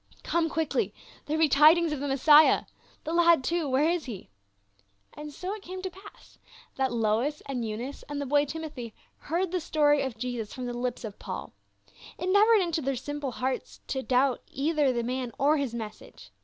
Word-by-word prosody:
" - - -26
Come 330 -1 0
quickly; 315 -1 -1 0.3
there 305 +1 0
be 320 0 +4
tidings 310 +4 +5
of 300 - -2
the 285 - -3
Messiah! 295 +3 +6 0.4
The 320 - -4
lad, 340 -4 +5
too, 335 0 -1
where 270 +4 +3
is 340 -1 0
he 210 - -8 0.4
?" 100 0 -38
And 300 0 -8
so 365 +7 -5
it 425 - -8
came 370 0 -8
to 375 - -3
pass 415 +7 -16 0.4
that 265 -2 0
Lois 235 +6 0
and 255 -3 -3
Eunice 230 +5 -5
and 290 -1 -3
the 285 - -3
boy 290 +2 +3
Timothy 290 -6 -7 0.2
heard 340 +3 -2
the 365 - 0
story 295 -3 +2
of 260 -4 -4
Jesus 235 -3 -4
from 255 -2 -5
the 245 - -4
lips 245 0 -3
of 210 -3 -7
Paul. - - -6 0.6
It 360 - -3
never 415 +3 +5
entered 405 - +4
into 335 -2 -1
their 275 -1 -1
simple 280 +1 -4
hearts 260 +2 -3
to 265 - -1
doubt 260 0 +1
either 290 0 +1
the 240 -1 -1
man 250 -1 -3
or 295 +3 +3
his 270 -5 -2
message. 210 - -9
285 Hz, 200 wpm, -28 LUFS, 250-320 Hz, 0.6 s, Messiah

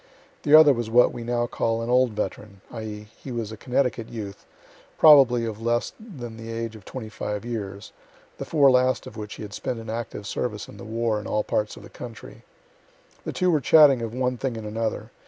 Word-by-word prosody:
The 150 +1 +5
other 155 -2 +8
was 120 -2 -3
what 120 +2 +5
we 120 - -6
now 120 0 0
call 115 -1 -1
an 115 - -4
"old 125 -2 +3
veteran," 105 -1 -5
(i.e., 105 -2 -7 0.2
he 135 - -6
was 115 -3 -4
a - - -6
Connecticut 125 -1 -1
youth, 105 -4 -8 0.5
probably 130 -6 +7
of 110 -1 -5
less 120 +1 0
than 130 - -9
the 115 0 -8
age 115 -1 -4
of 105 - -13
twenty 125 -4 -7
five 105 0 -5
years, 100 -4 -6 0.5
the - - -4
four 140 -4 +4
last 130 0 +2
of - - -10
which 105 -1 -7
he - - -8
had 100 -1 -8
spent 120 - -3
in 115 -1 -7
active 115 -3 -5
service 105 0 -3
in - - -13
the - - -10
war 115 -1 -1
in 105 - -8
all 105 - 0
parts 105 0 -2
of - - -12
the - - -12
country.) 120 -3 -10 0.8
The - - -3
two 180 -1 +1
were 155 -3 +2
chatting 140 -3 +6
of 115 -1 -4
one 125 +1 -1
thing 125 -2 -3
and 110 - -7
another. 110 +1 -3
115 Hz, 215 wpm, -25 LUFS, 110-125 Hz, 0.8 s, other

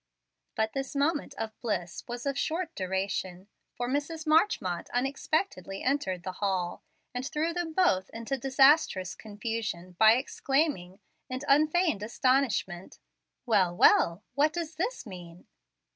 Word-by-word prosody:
But 220 0 0
this 270 0 -4
moment 290 +1 0
of 220 -1 -4
bliss 180 -8 -3
was 240 +2 -6
of 280 -1 0
short 330 +4 -2
duration, 190 0 -3 0.3
for 245 - -2
Mrs. 290 +4 -2
Marchmont 310 - +2
unexpectedly 255 - -2
entered 190 -10 -1
the 185 - -3
hall, 185 -3 -1 0.3
and 250 +1 -3
threw 315 +4 -1
them 350 -2 -3
both 195 - +2
into 230 +4 -3
disastrous 270 - +3
confusion 210 -4 -5
by 220 0 +8
exclaiming, 260 - -1 0.3
in 255 0 -4
unfeigned 310 - +3
astonishment, 230 -6 0 0.5
"Well, 190 -7 +2
well! 170 +4 +5
what 300 +2 +2
does 335 -2 -4
this 375 - -3
mean?" 180 -4 -11
245 Hz, 130 wpm, -29 LUFS, 190-295 Hz, 0.5 s, by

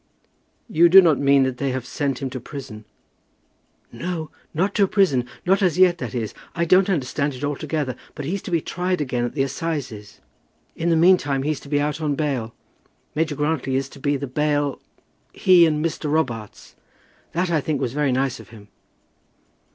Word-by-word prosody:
"You 170 -6 +4
do 190 +3 +10
not 165 -6 +4
mean 140 -1 +4
that 130 -1 -2
they 140 +1 -1
have 130 -1 -3
sent 135 0 -3
him 130 - -3
to 130 - -5
prison?" 120 -5 -9 1.1
"No; 165 -2 -5 0.2
not 190 +5 0
to 200 -2 +3
prison; 160 - +2 0.2
not 190 +2 +3
as 180 -4 +2
yet, 180 -2 +5
that 135 - -5
is. 115 -3 -3 0.2
I 170 - +1
don't 185 +3 +4
understand 140 -4 -1
it 125 - -9
altogether; 145 -1 -2 0.2
but 145 - -6
he's 185 +6 -2
to - - -8
be 170 -3 +1
tried 180 +2 -2
again 125 -4 -1
at 120 - -5
the 135 - +2
assizes. 135 -8 -5 0.6
In 170 - -1
the 165 - +3
meantime 160 -5 +3
he's 150 0 -1
to 140 - -13
be 145 -1 +1
out 150 +1 -2
on 150 -2 0
bail. 135 -7 -2 0.6
Major 155 -1 -1
Grantly 145 -3 -1
is 135 0 0
to 140 - -14
be 145 +1 0
the 140 - -4
bail, 145 +1 -1 0.5
he 175 -2 +5
and 155 0 0
Mr. 155 -2 -2
Robarts. 120 -9 -3 0.6
That, 175 +1 0
I 160 -3 +2
think, 150 -1 -2
was 120 - -2
very 145 -1 +1
nice 130 +1 0
of - - -13
him." 105 -3 -14
145 Hz, 190 wpm, -22 LUFS, 135-165 Hz, 1.1 s, do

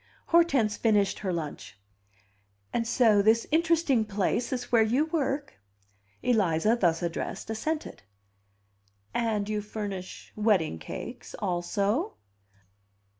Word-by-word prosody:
Hortense 280 -11 +3
finished 205 -3 +2
her 190 -3 -2
lunch. 155 - -5 1.0
"And 230 -1 0
so 225 -4 +4
this 220 +2 +3
interesting 320 -6 +3
place 210 +3 -1
is 250 -2 -4
where 235 -2 +5
you 245 +7 +2
work?" 290 - -2 0.6
Eliza, 210 -2 +2
thus 175 -6 +1
addressed, 170 +5 -4
assented. 305 +8 -3 1.1
"And 215 -3 0
you 210 0 -1
furnish 205 -3 -6
wedding 200 - +1
cakes - - -8
also?" 200 - -1
220 Hz, 105 wpm, -28 LUFS, 200-250 Hz, 1.1 s, where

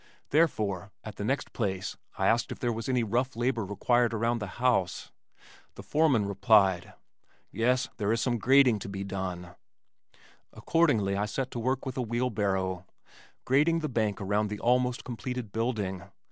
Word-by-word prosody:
Therefore, 105 - +1
at 110 - -9
the - - -4
next 130 +5 -2
place 95 -4 -2 0.2
I - - 0
asked 115 +1 +2
if - - -5
there 120 -1 -1
was 115 +3 -5
any 125 -2 +2
rough 125 +4 -1
labor 120 -1 0
required 120 +4 +1
around 115 +2 0
the 100 - -4
house. 120 -8 0 0.6
The - - -9
foreman 145 -9 +2
replied: 100 -3 +3 0.6
"Yes, 125 +4 +1
there 105 -1 0
is 115 - +1
some 120 0 0
grading 130 -1 +5
to 100 - -7
be 95 0 -4
done." 90 -3 -5 1.0
Accordingly 115 -13 +2
I 105 +1 -1
set 130 +4 -3
to 120 - -4
work 130 +2 -1
with 130 -1 -5
a - - 0
wheelbarrow, 100 -6 -1 0.6
grading 155 +6 +3
the 155 - -2
bank 110 -4 -1
around 105 +2 0
the 105 - -4
almost 125 0 +1
completed 125 -2 -5
building. 105 -5 -2
115 Hz, 160 wpm, -29 LUFS, 100-125 Hz, 1.0 s, grading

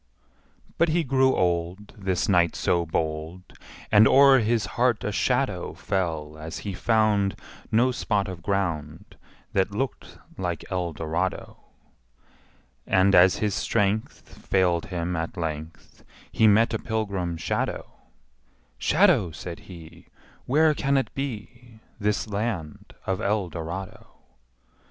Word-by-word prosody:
But 170 - +4
he 165 +2 +1
grew 130 -1 +3
old, 90 +3 -1
This 95 -4 -1
knight 85 -4 +3
so 85 -1 0
bold, 80 +2 -3 0.5
And 105 +1 +7
o'er 135 -1 +7
his 115 -2 +1
heart 120 -2 +1
a 105 - -2
shadow 125 -4 -1
Fell 80 -5 -3
as 80 +2 -6
he 100 - -3
found 105 -1 +2 0.4
No 120 +4 +3
spot 105 -5 -1
of 90 -2 -7
ground 85 -2 -3 0.4
That 95 0 +2
looked 125 +6 -4 0.2
like 90 -3 -3
Eldorado. 85 0 -3 1.3
And, 95 +1 +3
as 90 +1 +6
his 105 -2 -1
strength 105 0 -1 0.2
Failed 90 -3 +1
him 90 -1 -3
at 85 +4 -4
length, 80 -1 -6 0.3
He 110 - +4
met 110 +2 +4
a - - -1
pilgrim 100 -7 -2
shadow: 80 - -3 0.9
``Shadow,'' 135 - +3
says 85 0 -7
he, 85 -4 -13 0.4
``Where 155 +3 +4
can 140 -1 +1
it 135 - -1
be, 120 -3 -7 0.2
This 105 +1 0
land 100 -7 -4
of 95 +2 -2
Eldorado?'' 95 -3 -3
95 Hz, 120 wpm, -25 LUFS, 85-110 Hz, 1.3 s, And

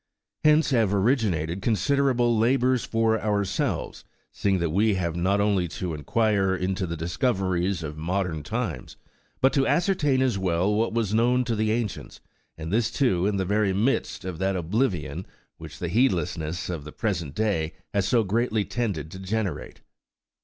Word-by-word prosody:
Hence 155 0 +4
have 110 -6 +2
originated 95 - +1
considerable 120 +1 +2
labours 125 +2 +2
for 115 -1 +1
ourselves, 100 -3 -1 0.3
seeing 100 -2 0
that 85 -3 -1
we 105 +4 +2
have 85 -3 -2
not 95 +4 +1
only 100 -3 +2
to 85 +1 -4
enquire 95 +5 +1
into 95 0 -2
the 85 0 -4
discoveries 95 - -1
of 75 0 -6
modern 90 -1 -2
times, 95 - -4 0.4
but 135 - +4
to 135 -2 +2
ascertain 160 -8 +2
as 125 -7 0
well 95 +2 +1
what 110 +2 +1
was 110 -3 -1
known 120 +3 +3
to 120 -2 -1
the 110 0 0
ancients, 110 -3 -3 0.4
and 80 +3 -5
this, 115 0 +2
too, 100 -9 +1
in 105 -1 0
the 95 - 0
very 100 0 +1
midst 110 -1 0
of 90 -3 -5
that 95 0 0
oblivion 90 - -1 0.3
which - - -10
the - - -3
heedlessness 90 -8 0
of 85 -5 -4
the 75 - -9
present 85 - -3
day 90 -8 0 0.2
has 100 -2 +1
so 120 -2 +3
greatly 110 +1 0
tended 95 -11 -3
to 95 - -8
generate. 95 -4 -3
100 Hz, 160 wpm, -25 LUFS, 90-115 Hz, 0.4 s, Hence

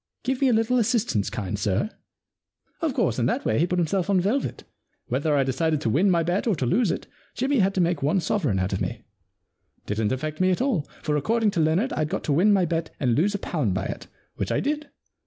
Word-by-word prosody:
Give 260 +1 -1
me 275 - +4
a 250 - +4
little 225 +3 +2
assistance, 220 - +1
kind 105 0 -4
sir? 105 - 0 0.3
" - - -64
* - - -43
Of 315 -5 -1
course, 175 - +1
in 120 - +2
that - - -1
way 110 - +1
he 170 - +3
put 180 - -1
himself 175 +3 0
on 195 -2 +4
velvet. 210 +10 -1 0.5
Whether 155 -2 +1
I 140 - +3
decided 150 +4 0
to 115 - 0
win 175 - +3
my 170 -2 +3
bet 175 +7 -1
or 215 - +3
to 135 - -2
lose 220 - +2
it, - - -2 0.3
Jimmy 265 +1 +1
had 195 0 +2
to 185 - +2
make 170 -3 +1
one 150 +7 +2
sovereign 155 - 0
out 95 +1 -1
of 95 - -2
me. - - -3 0.8
Didn't 105 +1 -1
affect 155 +5 -3
me 185 - +4
at 180 - +1
all, 245 - 0
for 150 - 0
according 220 +8 +1
to 175 - -2
Leonard 160 +10 +2
Fd 155 - -1
got 190 +5 -3
to 145 - 0
win 185 +8 +4
my 195 -3 +4
bet 165 0 -2
and 125 -4 +2
lose 190 - +2
a - - +1
pound 145 - -1
by 95 - -2
it, - - -6 0.3
which - - -2
I - - +1
did. 300 +1 -2
175 Hz, 250 wpm, -25 LUFS, 140-210 Hz, 0.8 s, me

